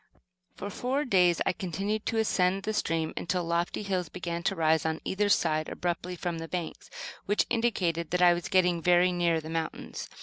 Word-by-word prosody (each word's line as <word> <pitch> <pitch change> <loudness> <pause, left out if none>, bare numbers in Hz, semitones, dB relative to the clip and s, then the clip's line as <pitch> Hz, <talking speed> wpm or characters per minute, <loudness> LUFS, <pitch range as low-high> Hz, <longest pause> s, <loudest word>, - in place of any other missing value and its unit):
For 205 - -6
four 265 +6 -1
days 180 -7 +3
I - - +2
continued 195 +5 -3
to 225 - 0
ascend 195 -3 +2
the 215 - -2
stream, 165 -6 -1
until 180 +1 -1
lofty 170 +4 -1
hills 185 -4 -2
began 170 -1 -4
to - - +1
rise 160 -1 +2
on 160 0 -1
either 205 +2 0
side 155 -5 +2
abruptly 180 +1 -3
from 175 -1 -3
the 165 - -6
banks; 175 -1 -5 0.4
which 205 +1 +2
indicated 180 -9 0
that 180 0 0
I 175 -1 +7
was 175 -1 -3
getting 180 -3 +3
very 180 +1 +4
near 170 -2 +1
the 160 0 -8
mountains. 165 0 -4
175 Hz, 190 wpm, -29 LUFS, 165-195 Hz, 0.4 s, I